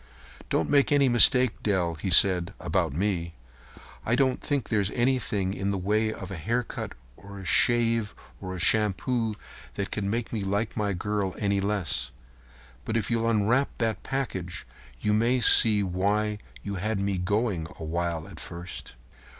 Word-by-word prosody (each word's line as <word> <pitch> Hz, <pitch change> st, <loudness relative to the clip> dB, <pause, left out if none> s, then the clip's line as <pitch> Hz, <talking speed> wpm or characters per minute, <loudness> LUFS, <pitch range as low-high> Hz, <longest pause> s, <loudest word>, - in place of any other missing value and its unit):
"Don't 80 Hz, -, +1 dB
make 140 Hz, 0 st, +3 dB
any 140 Hz, -2 st, +4 dB
mistake, 125 Hz, 0 st, +5 dB
Dell," 90 Hz, -5 st, 0 dB
he 80 Hz, +4 st, -4 dB
said, 90 Hz, 0 st, +4 dB
"about -, -, 0 dB
me. 85 Hz, 0 st, -2 dB, 0.7 s
I 120 Hz, -, +1 dB
don't 130 Hz, -1 st, +1 dB
think 140 Hz, -3 st, -1 dB
there's 105 Hz, -4 st, +1 dB
anything 120 Hz, -7 st, 0 dB
in 95 Hz, 0 st, -2 dB
the 100 Hz, -, -1 dB
way 105 Hz, +4 st, +1 dB
of 95 Hz, -3 st, -8 dB
a 95 Hz, -, -5 dB
haircut 115 Hz, +9 st, -3 dB, 0.2 s
or 100 Hz, +5 st, -12 dB
a 95 Hz, -, -9 dB
shave 115 Hz, +1 st, +2 dB, 0.3 s
or 95 Hz, -1 st, -5 dB
a -, -, -6 dB
shampoo 110 Hz, +4 st, +1 dB, 0.4 s
that 100 Hz, -1 st, -3 dB
could 105 Hz, -, -3 dB
make 115 Hz, +4 st, -2 dB
me 110 Hz, -3 st, -2 dB
like 100 Hz, +3 st, -1 dB
my 105 Hz, -2 st, -1 dB
girl 100 Hz, 0 st, -2 dB
any 100 Hz, -1 st, 0 dB
less. 95 Hz, -11 st, -1 dB, 0.7 s
But 110 Hz, +4 st, -1 dB
if 115 Hz, -, -2 dB
you'll 115 Hz, 0 st, +1 dB
unwrap 115 Hz, +5 st, +2 dB
that 115 Hz, -2 st, -1 dB
package 95 Hz, -10 st, -4 dB, 0.4 s
you 105 Hz, -, +1 dB
may 120 Hz, +4 st, +2 dB
see 110 Hz, -3 st, +6 dB
why 105 Hz, +3 st, 0 dB, 0.2 s
you 100 Hz, -, -4 dB
had 110 Hz, +1 st, -1 dB
me 100 Hz, -1 st, -1 dB
going 100 Hz, -3 st, -1 dB
a -, -, -6 dB
while 85 Hz, 0 st, -2 dB
at -, -, -11 dB
first." 85 Hz, +1 st, -8 dB
105 Hz, 165 wpm, -27 LUFS, 95-115 Hz, 0.7 s, see